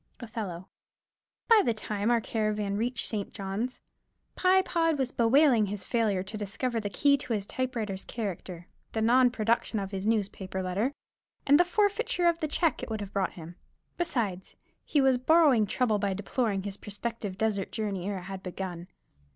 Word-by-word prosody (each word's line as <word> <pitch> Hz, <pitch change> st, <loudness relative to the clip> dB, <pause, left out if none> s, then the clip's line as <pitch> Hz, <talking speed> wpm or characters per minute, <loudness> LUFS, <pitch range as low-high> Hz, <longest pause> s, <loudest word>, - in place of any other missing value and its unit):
Othello. 210 Hz, -7 st, -6 dB, 0.8 s
By 455 Hz, -2 st, +7 dB
the 235 Hz, -, +1 dB
time 210 Hz, 0 st, -2 dB
our 240 Hz, -1 st, +4 dB
caravan 210 Hz, -2 st, -1 dB
reached 235 Hz, +3 st, -1 dB
St. 205 Hz, -3 st, -3 dB
Johns, 200 Hz, +6 st, -4 dB, 0.6 s
Pye 375 Hz, +1 st, +4 dB
Pod 330 Hz, -4 st, +1 dB
was 260 Hz, -2 st, -1 dB
bewailing 240 Hz, -2 st, +4 dB
his 200 Hz, 0 st, -4 dB
failure 215 Hz, -6 st, +1 dB
to 210 Hz, +3 st, -7 dB
discover 225 Hz, +4 st, -2 dB
the 205 Hz, -2 st, -3 dB
key 280 Hz, +7 st, +3 dB
to 250 Hz, -, -4 dB
his 205 Hz, -3 st, -1 dB
typewriter's 225 Hz, -6 st, -3 dB
character, 185 Hz, -5 st, -5 dB, 0.3 s
the 220 Hz, -, -1 dB
non 250 Hz, +2 st, +5 dB
production 230 Hz, -1 st, 0 dB
of 195 Hz, -1 st, -3 dB
his 195 Hz, +1 st, -3 dB
newspaper 190 Hz, -3 st, -1 dB
letter, 200 Hz, +9 st, -1 dB, 0.5 s
and 285 Hz, +2 st, +6 dB
the -, -, +7 dB
forfeiture 405 Hz, -1 st, +1 dB
of 340 Hz, -1 st, +2 dB
the 310 Hz, -, -1 dB
check 315 Hz, 0 st, +1 dB
it -, -, -6 dB
would 220 Hz, -1 st, -3 dB
have 200 Hz, -1 st, -7 dB
brought 195 Hz, -1 st, 0 dB
him; 170 Hz, +1 st, -10 dB, 0.4 s
besides, 225 Hz, -, -2 dB, 0.3 s
he 295 Hz, -, +1 dB
was 265 Hz, -2 st, +4 dB
borrowing 275 Hz, -6 st, +5 dB
trouble 220 Hz, -1 st, +1 dB
by 200 Hz, -1 st, 0 dB
deploring 205 Hz, 0 st, -1 dB
his 200 Hz, 0 st, -5 dB
prospective 205 Hz, -1 st, -5 dB
desert 205 Hz, -3 st, -1 dB
journey 200 Hz, -4 st, -3 dB
ere 200 Hz, -, -2 dB
it 180 Hz, -, -7 dB
had 190 Hz, +1 st, -7 dB
begun. 180 Hz, -2 st, -6 dB
220 Hz, 175 wpm, -29 LUFS, 195-255 Hz, 0.8 s, By